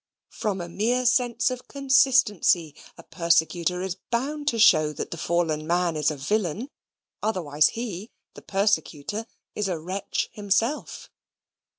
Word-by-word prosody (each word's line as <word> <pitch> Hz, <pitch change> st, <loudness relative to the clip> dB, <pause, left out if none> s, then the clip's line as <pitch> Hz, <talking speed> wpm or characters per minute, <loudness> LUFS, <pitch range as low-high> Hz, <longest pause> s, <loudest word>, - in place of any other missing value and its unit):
From 195 Hz, -4 st, -3 dB
a 170 Hz, -, -5 dB
mere 235 Hz, +8 st, 0 dB
sense 245 Hz, 0 st, +2 dB
of 250 Hz, -1 st, -7 dB
consistency, 265 Hz, -, +3 dB, 0.2 s
a -, -, -12 dB
persecutor 170 Hz, +1 st, +1 dB
is 190 Hz, -1 st, -4 dB
bound 285 Hz, +5 st, -2 dB
to 230 Hz, -, +1 dB
show 155 Hz, -8 st, +5 dB
that -, -, -6 dB
the 170 Hz, -, -5 dB
fallen 160 Hz, -3 st, -1 dB
man 175 Hz, -1 st, +1 dB
is 150 Hz, -1 st, +2 dB
a 155 Hz, -, -4 dB
villain 210 Hz, -, -2 dB, 0.5 s
otherwise 155 Hz, -8 st, +2 dB
he, 215 Hz, -3 st, -5 dB, 0.2 s
the -, -, -12 dB
persecutor, 195 Hz, +1 st, -1 dB, 0.3 s
is 210 Hz, -, -2 dB
a 180 Hz, -3 st, -2 dB
wretch 185 Hz, +5 st, -3 dB
himself. 210 Hz, +7 st, -2 dB
195 Hz, 135 wpm, -25 LUFS, 170-235 Hz, 0.5 s, show